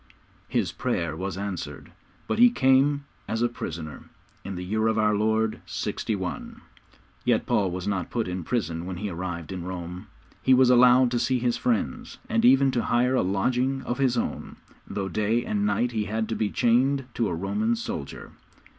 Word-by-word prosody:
His -, -, 0 dB
prayer 85 Hz, -3 st, -2 dB
was 95 Hz, +2 st, -4 dB
answered, 100 Hz, -3 st, -5 dB, 0.4 s
but -, -, -1 dB
he 245 Hz, +1 st, +8 dB
came 140 Hz, -, +3 dB, 0.2 s
as 115 Hz, +1 st, -1 dB
a -, -, +4 dB
prisoner 80 Hz, -9 st, -7 dB, 0.4 s
in 100 Hz, -, -5 dB
the 90 Hz, 0 st, -5 dB
year 110 Hz, +4 st, 0 dB
of 110 Hz, 0 st, +1 dB
our 105 Hz, -1 st, +3 dB
Lord 110 Hz, +1 st, +1 dB
61. 95 Hz, -5 st, -4 dB, 0.6 s
Yet -, -, +2 dB
Paul 100 Hz, -3 st, +1 dB
was 90 Hz, +2 st, -4 dB
not 95 Hz, -3 st, -1 dB
put 115 Hz, -4 st, -2 dB
in 90 Hz, -1 st, -4 dB
prison 85 Hz, -6 st, -2 dB
when 95 Hz, -1 st, -5 dB
he 105 Hz, +2 st, -4 dB
arrived 85 Hz, -1 st, -5 dB
in 90 Hz, -2 st, -5 dB
Rome. 90 Hz, 0 st, -6 dB, 0.3 s
He 130 Hz, -, +5 dB
was 125 Hz, -1 st, +5 dB
allowed 125 Hz, 0 st, +6 dB
to 120 Hz, -, +1 dB
see 125 Hz, +2 st, +1 dB
his 120 Hz, -1 st, 0 dB
friends, 110 Hz, -, -2 dB
and 115 Hz, 0 st, +1 dB
even 135 Hz, +2 st, +6 dB
to 120 Hz, -, 0 dB
hire 125 Hz, +2 st, +2 dB
a 130 Hz, -, +3 dB
lodging 125 Hz, +8 st, 0 dB
of 120 Hz, -, -3 dB
his 130 Hz, -3 st, +2 dB
own, -, -, -3 dB, 0.3 s
though 95 Hz, -1 st, -3 dB
day 110 Hz, +5 st, 0 dB
and 210 Hz, -1 st, 0 dB
night 125 Hz, -11 st, +1 dB
he 110 Hz, -3 st, -1 dB
had 110 Hz, +1 st, -2 dB
to 115 Hz, -, -1 dB
be 105 Hz, -, 0 dB
chained 130 Hz, +5 st, +2 dB
to 115 Hz, -, 0 dB
a 85 Hz, -, -2 dB
Roman 215 Hz, -, 0 dB
soldier. 230 Hz, -, -6 dB
110 Hz, 185 wpm, -26 LUFS, 95-125 Hz, 0.6 s, he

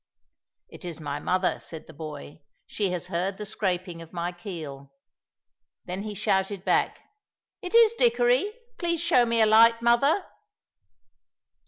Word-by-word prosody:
"It -, -, -14 dB
is 170 Hz, -3 st, -6 dB
my 145 Hz, -2 st, -4 dB
mother," 185 Hz, 0 st, 0 dB
said 160 Hz, -2 st, -10 dB
the 160 Hz, -, -14 dB
boy; 150 Hz, -1 st, -9 dB, 0.2 s
"she 205 Hz, -3 st, -2 dB
has 180 Hz, -2 st, -3 dB
heard 185 Hz, +3 st, -2 dB
the 210 Hz, -, -6 dB
scraping 185 Hz, -5 st, -3 dB
of 165 Hz, -, -12 dB
my 175 Hz, 0 st, -3 dB
keel." 155 Hz, -7 st, -8 dB, 0.9 s
Then 185 Hz, +2 st, -4 dB
he 210 Hz, 0 st, -6 dB
shouted 190 Hz, 0 st, -1 dB
back, -, -, +1 dB, 0.6 s
"It 365 Hz, +3 st, -4 dB
is 465 Hz, -1 st, +7 dB
Dickory; 245 Hz, -, +2 dB, 0.3 s
please 340 Hz, -1 st, -1 dB
show 310 Hz, -8 st, +3 dB
me 230 Hz, 0 st, +2 dB
a -, -, +6 dB
light, 230 Hz, +2 st, +6 dB
mother!" 275 Hz, +10 st, +3 dB
195 Hz, 145 wpm, -26 LUFS, 170-235 Hz, 0.9 s, is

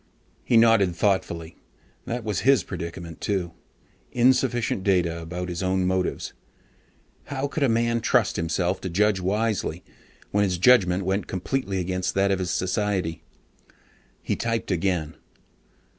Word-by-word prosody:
He 115 Hz, -, +3 dB
nodded 115 Hz, -6 st, +4 dB
thoughtfully. 85 Hz, -4 st, -1 dB, 0.5 s
That 120 Hz, 0 st, -3 dB
was 105 Hz, -3 st, -1 dB
his 135 Hz, -7 st, +4 dB
predicament 85 Hz, 0 st, -7 dB
too: 95 Hz, -4 st, -1 dB, 0.6 s
insufficient 120 Hz, -4 st, +2 dB
data 85 Hz, -4 st, +1 dB
about 90 Hz, +2 st, -5 dB
his 85 Hz, -2 st, -4 dB
own 95 Hz, 0 st, +1 dB
motives. 95 Hz, 0 st, -1 dB, 0.9 s
How 140 Hz, 0 st, -3 dB
could 150 Hz, -, -4 dB
a 140 Hz, -, +3 dB
man 115 Hz, +1 st, +1 dB
trust -, -, +2 dB
himself 85 Hz, +3 st, -1 dB
to 95 Hz, -, -4 dB
judge 100 Hz, +3 st, +2 dB
wisely, 105 Hz, +3 st, -1 dB, 0.5 s
when 105 Hz, 0 st, +2 dB
his 90 Hz, -3 st, 0 dB
judgement 95 Hz, -3 st, +4 dB
went 95 Hz, +1 st, -1 dB
completely 95 Hz, +2 st, -2 dB
against 90 Hz, 0 st, -2 dB
that 100 Hz, 0 st, +2 dB
of 95 Hz, -, +1 dB
his 90 Hz, -2 st, -2 dB
society? 90 Hz, -2 st, -1 dB, 1.0 s
He -, -, -1 dB
typed 115 Hz, -2 st, -2 dB
again. 85 Hz, -4 st, -1 dB
95 Hz, 135 wpm, -25 LUFS, 90-115 Hz, 1.0 s, nodded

